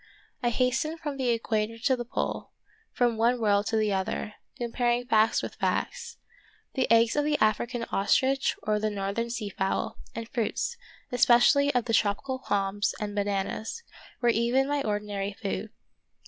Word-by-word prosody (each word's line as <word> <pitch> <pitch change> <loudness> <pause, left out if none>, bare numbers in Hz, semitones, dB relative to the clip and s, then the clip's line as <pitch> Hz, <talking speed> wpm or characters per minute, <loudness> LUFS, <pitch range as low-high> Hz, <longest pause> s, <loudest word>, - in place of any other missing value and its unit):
I 240 - +2
hastened 255 +7 0
from 295 -3 -4
the 260 -2 0
equator 225 -1 0
to 260 +3 +2
the 240 - -4
pole, 240 - -3 0.4
from 240 -3 +1
one 240 +2 +2
world 205 -2 +2
to - - 0
the 215 -2 +1
other, 190 +2 -2 0.2
comparing 240 0 0
facts 220 -2 +3
with - - -5
facts. 470 0 -2 0.6
The 260 - 0
eggs 230 0 +5
of 295 - +2
the 300 0 +1
African 230 +3 +1
ostrich 265 +7 +2
or 210 0 +1
the 215 0 0
northern 205 +3 -2
sea 225 -3 -3
fowl, 195 -1 -2 0.2
and 230 -1 -5
fruits, 230 -2 -2 0.4
especially 245 +4 +5
of 245 -2 +2
the 230 - -2
tropical 225 +5 +1
palms 200 -3 -1
and 210 -1 -3
bananas, 205 - -2 0.4
were 240 - +3
even 235 +4 +2
my 290 0 0
ordi 210 -4 -1
nary 200 -1 -3
food. 200 +2 -4
230 Hz, 160 wpm, -28 LUFS, 210-250 Hz, 0.6 s, eggs